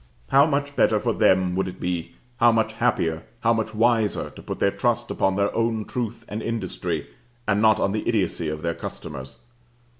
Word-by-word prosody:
How 140 +2 +6
much 145 -1 -1
better - - +3
for - - 0
them 95 -1 +3
would 95 - 0
it 90 - -8
be 90 -2 -3 0.2
how 120 0 +6
much 110 -1 +1
happier, 95 -9 0 0.2
how 115 0 +4
much 110 -1 -2
wiser, 115 -1 +2
to - - -12
put - - -5
their - - +2
trust - - 0
upon 95 0 +1
their 100 +1 0
own 115 -2 0
truth 115 -2 -4
and 105 +2 -4
industry, 90 -9 -3 0.4
and 105 0 +2
not 110 -1 +5
on 95 - +1
the 105 +1 -2
idiocy 95 -7 0
of 75 +1 -5
their 85 0 0
customers. 65 -5 -7
105 Hz, 190 wpm, -24 LUFS, 90-115 Hz, 0.4 s, How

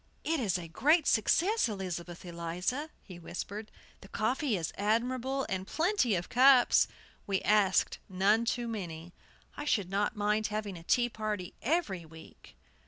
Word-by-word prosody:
"It's 245 - 0
a 170 -2 -7
great 295 - +3
success, 355 - +3
Elizabeth 180 -3 -5
Eliza," 175 - -3
he 180 -3 -11
whispered. 205 +5 -6 0.3
"The - - -14
coffee 225 +4 0
is 165 -2 -4
admirable, 250 +6 0
and 190 0 -3
plenty 325 - +1
of 175 0 -3
cups. 255 0 +5 0.4
We 195 -1 +1
asked 205 -2 +3
none 200 +5 +2
too 240 0 -1
many. 175 -6 -6 0.4
I 295 - -6
should 200 -10 0
not 205 +3 0
mind 210 +1 +1
having 210 -2 -4
a 170 - -9
tea 240 +7 +2
party 210 -5 -4
every 250 - 0
week." 160 0 -15
210 Hz, 145 wpm, -31 LUFS, 185-250 Hz, 0.4 s, cups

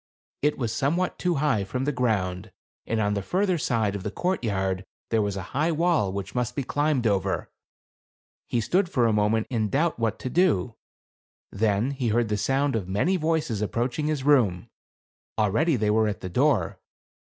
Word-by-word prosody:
It 150 +1 +1
was 115 -4 -2
somewhat 160 +10 0
too 180 -1 +1
high 135 -8 +1
from 125 +7 -3
the 145 - +1
ground, 105 -6 -1 0.4
and 115 - 0
on 105 -1 +1
the 100 - -1
further 185 - 0
side 110 -7 0
of 100 - -4
the 105 - -3
courtyard 100 - -1 0.3
there 115 -1 +3
was 100 -1 -2
a 95 - -4
high 155 +5 +1
wall 165 - +1
which 100 0 -5
must 125 -2 -2
be 140 - -1
climbed 145 -2 0
over. 100 -4 0 1.0
He 120 - 0
stood 180 - +1
for 125 -8 +2
a 115 - +3
moment 105 +1 +2
in 110 -4 0
doubt 155 - 0
what 115 -2 0
to 130 - -3
do; 150 - +2 0.8
then 105 +4 +1
he 130 -3 -2
heard 115 0 +1
the 105 - +1
sound 135 +4 +1
of 100 -5 -2
many 130 - +1
voices 155 - 0
approaching 120 +7 -1
his 150 -3 -1
room; 120 -12 +3 0.7
already 115 - +2
they 105 -3 +1
were 110 0 +3
at 100 -3 -3
the 95 - -5
door. - - +1
115 Hz, 185 wpm, -26 LUFS, 105-150 Hz, 1.0 s, there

